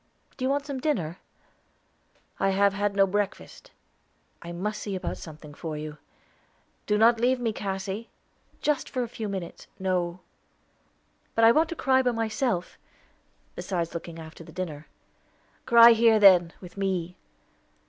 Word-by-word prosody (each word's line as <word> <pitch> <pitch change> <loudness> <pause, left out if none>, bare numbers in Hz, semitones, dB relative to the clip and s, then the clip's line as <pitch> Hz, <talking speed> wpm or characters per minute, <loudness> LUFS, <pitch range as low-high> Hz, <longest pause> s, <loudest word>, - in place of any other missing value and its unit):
"Do 255 - -7
you 260 - +1
want 280 +1 0
some 280 -2 -4
dinner?" 180 - -2 1.2
"I 195 - +2
have 200 +1 +3
had 205 0 -1
no 195 -1 +5
breakfast." 205 - -4 0.7
"I 170 - -8
must 210 +5 -4
see 200 -2 -4
about 185 - -4
something 150 -2 -11
for 155 0 -6
you." 150 0 -7 0.9
"Not 225 +3 +5
to - - -7
leave 250 +1 +2
me, 230 -3 -1
Cassy." 195 +2 -4 0.5
"Just 300 -2 0
for 255 - -2
a - - -4
few 220 -2 -6
minutes." 190 -4 -6
"No." 180 -1 -1 1.1
"But 225 - +5
I 225 - +8
want 315 +5 +2
to 335 - -4
cry 265 -3 +3
by 250 -2 +1
myself, 225 -4 -2 0.8
besides 170 -3 -3
looking 170 0 -7
after 160 +1 -10
the - - -13
dinner." 160 -5 -6 0.8
"Cry 235 -1 +9
here 225 -1 +5
then, 180 -4 +7
with 180 +1 -12
me. 185 -3 -2
200 Hz, 150 wpm, -26 LUFS, 175-230 Hz, 1.2 s, Cry